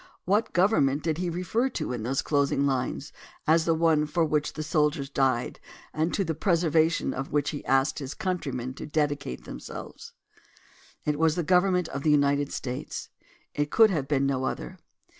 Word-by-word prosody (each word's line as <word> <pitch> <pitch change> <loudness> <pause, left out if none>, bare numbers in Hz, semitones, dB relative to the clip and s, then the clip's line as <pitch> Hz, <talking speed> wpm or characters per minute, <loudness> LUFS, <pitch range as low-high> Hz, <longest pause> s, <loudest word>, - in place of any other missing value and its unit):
What 210 +4 +1
government 175 -7 +3
did 160 -1 -1
he 180 -1 -1
refer 185 +9 0
to 180 - -3
in 120 - -4
those 130 +5 -1
closing 140 -1 +1
lines 135 +2 -2 0.3
as 160 +1 +4
the 165 - +3
one 160 -2 +3
for 165 +2 +1
which 150 -1 0
the 155 - -4
soldiers 150 -2 0
died 130 -3 0 0.3
and 160 +2 0
to 200 - +1
the 165 -3 -2
preser 170 0 +1
vation 160 +1 +2
of 135 +1 -5
which 145 -1 +1
he 145 - -6
asked 135 +3 +2
his 135 -1 -6
countrymen 135 -9 -3
to 140 - -8
dedicate 145 - -2
themselves? - - -9 0.9
It 150 0 0
was 160 -1 +3
the 175 - -1
government 180 +1 +3
of 140 - -4
the 155 - +1
United 145 -1 +3
States. 130 +3 -5 0.4
It 145 0 -1
could 220 +3 +5
have 145 -7 -1
been 140 -1 +1
no 130 -1 0
other. - - -5
150 Hz, 180 wpm, -27 LUFS, 140-170 Hz, 0.9 s, could